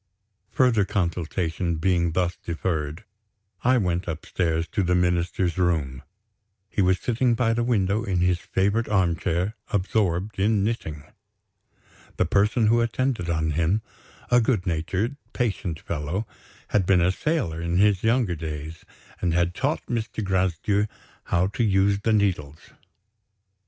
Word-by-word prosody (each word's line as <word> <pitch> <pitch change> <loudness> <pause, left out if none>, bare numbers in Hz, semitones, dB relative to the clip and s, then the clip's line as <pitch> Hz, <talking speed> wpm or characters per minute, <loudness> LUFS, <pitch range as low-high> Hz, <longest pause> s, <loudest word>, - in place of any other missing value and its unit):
Further 120 -4 +3
consultation 85 -2 -1
being 85 0 +1
thus 90 0 0
deferred, 80 0 -3 0.6
I 125 +1 +4
went 90 -4 0
upstairs 80 0 -1
to 105 - -1
the 90 -1 +2
Minister's 90 0 0
room. 75 -8 0 0.7
He - - 0
was 95 -1 +3
sitting 120 +2 +1
by 115 -2 +2
the 120 +1 0
window, 105 -2 +1
in 95 -5 -1
his 90 0 +2
favorite 100 +6 0
armchair, 90 0 +1 0.2
absorbed 95 -1 0
in 105 0 +2
knitting! 80 -10 -3 1.1
The - - +2
person 105 +3 +2
who 115 +2 +4
attended 115 -5 -1
on 80 -1 0
him, 85 +8 +1 0.5
a 125 0 +6
good 110 -5 +1
natured, 95 - -1 0.2
patient 100 - -2
fellow, 85 +8 -3 0.4
had 95 -4 +1
been 95 -2 +4
a 90 +2 +3
sailor 95 - -1
in 85 +1 -1
his 100 -1 +4
younger 115 -4 +2
days, 80 0 -6 0.4
and 85 -2 +1
had 85 0 +1
taught - - -1
Mr. 115 -2 -3
Gracedieu 95 +2 +1 0.4
how 85 +2 +2
to 105 +5 -1
use 100 -1 +3
the 110 +2 0
needles. 85 -8 -1
95 Hz, 135 wpm, -25 LUFS, 85-110 Hz, 1.1 s, a